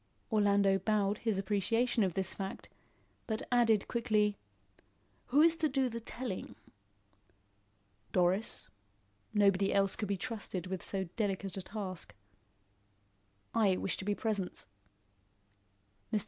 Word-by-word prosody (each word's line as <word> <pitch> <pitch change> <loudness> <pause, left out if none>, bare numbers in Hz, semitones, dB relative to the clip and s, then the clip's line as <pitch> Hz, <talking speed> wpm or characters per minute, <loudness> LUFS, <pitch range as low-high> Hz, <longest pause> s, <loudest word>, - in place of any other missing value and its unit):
Orlando 200 -2 +4
bowed 205 0 +1
his 220 -4 0
appreciation 215 +4 +1
of 185 -3 -1
this 190 -1 +1
fact, 195 -1 -6 0.6
but 220 -1 -2
added 225 -4 +4
quickly: 215 -3 +1 0.9
"Who 290 +4 +5
is 330 0 +5
to 315 -2 +1
do 265 -2 +1
the 230 0 -5
telling?" 230 -3 -5 1.6
"Doris. 185 +4 +1 0.6
Nobody 200 -2 +3
else 195 -1 +3
could 210 - -3
be 200 0 -1
trusted 200 -4 -4
with 185 -1 -4
so 195 -1 -2
delicate 195 -3 -1
a 190 - -3
task." 185 - -6 1.4
"I 200 -5 +3
wish 195 - 0
to - - -4
be 205 0 +1
present." 205 -5 -2 1.5
Mr. 215 - +2
205 Hz, 120 wpm, -33 LUFS, 195-225 Hz, 1.6 s, Who